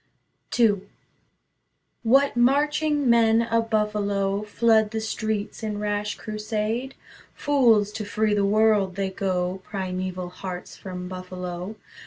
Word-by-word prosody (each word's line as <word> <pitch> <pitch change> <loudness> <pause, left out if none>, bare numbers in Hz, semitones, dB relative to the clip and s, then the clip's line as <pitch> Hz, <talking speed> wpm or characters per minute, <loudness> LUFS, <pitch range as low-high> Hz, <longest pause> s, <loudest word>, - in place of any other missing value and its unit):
II 215 -5 +4 1.2
What 270 +4 +3
marching 290 +3 +2
men 230 -1 +5
of 230 0 0
Buffalo 205 -2 0
Flood 220 0 +3
the 220 +1 -3
streets 220 -1 -3
in 215 -2 -3
rash 210 0 -2
crusade? 215 +4 -3 0.4
Fools 235 -8 +3
to 215 0 -5
free 210 +1 0
the 205 -1 +2
world, 205 -2 +3
they 195 -1 -2
go, 185 -1 -2
Primeval 185 -2 -4
hearts 180 0 -7
from 180 -1 -7
Buffalo. 185 +1 -6
210 Hz, 115 wpm, -25 LUFS, 195-225 Hz, 1.2 s, men